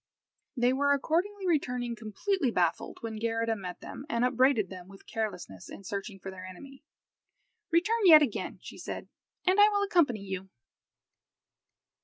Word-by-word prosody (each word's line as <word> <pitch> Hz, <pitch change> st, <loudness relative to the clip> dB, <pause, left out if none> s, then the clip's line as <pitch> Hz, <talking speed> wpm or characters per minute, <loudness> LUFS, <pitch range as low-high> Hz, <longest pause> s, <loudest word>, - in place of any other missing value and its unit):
They 245 Hz, +1 st, +3 dB
were 285 Hz, +1 st, +3 dB
accordingly 365 Hz, +8 st, 0 dB
returning 250 Hz, -8 st, 0 dB
completely 245 Hz, -, -1 dB
baffled, 175 Hz, -6 st, 0 dB
when 225 Hz, -1 st, -5 dB
Geirrida 225 Hz, 0 st, 0 dB
met 180 Hz, -4 st, -7 dB
them, 275 Hz, -, -9 dB
and 235 Hz, -3 st, +1 dB
upbraided 250 Hz, -5 st, +3 dB
them 180 Hz, -1 st, -9 dB
with 195 Hz, 0 st, -15 dB
carelessness 180 Hz, -, -5 dB
in -, -, -10 dB
searching 200 Hz, +1 st, -5 dB
for 190 Hz, 0 st, -8 dB
their 185 Hz, -1 st, -10 dB
enemy. 270 Hz, +10 st, -12 dB, 0.9 s
"Return 385 Hz, +8 st, +2 dB
yet 310 Hz, -3 st, +10 dB
again," 245 Hz, -8 st, -3 dB
she -, -, -10 dB
said, -, -, -6 dB, 0.4 s
"and 370 Hz, +2 st, +3 dB
I 415 Hz, +1 st, +8 dB
will 405 Hz, -1 st, +1 dB
accompany 335 Hz, -, +2 dB
you." 190 Hz, -1 st, -6 dB
240 Hz, 150 wpm, -29 LUFS, 195-310 Hz, 0.9 s, yet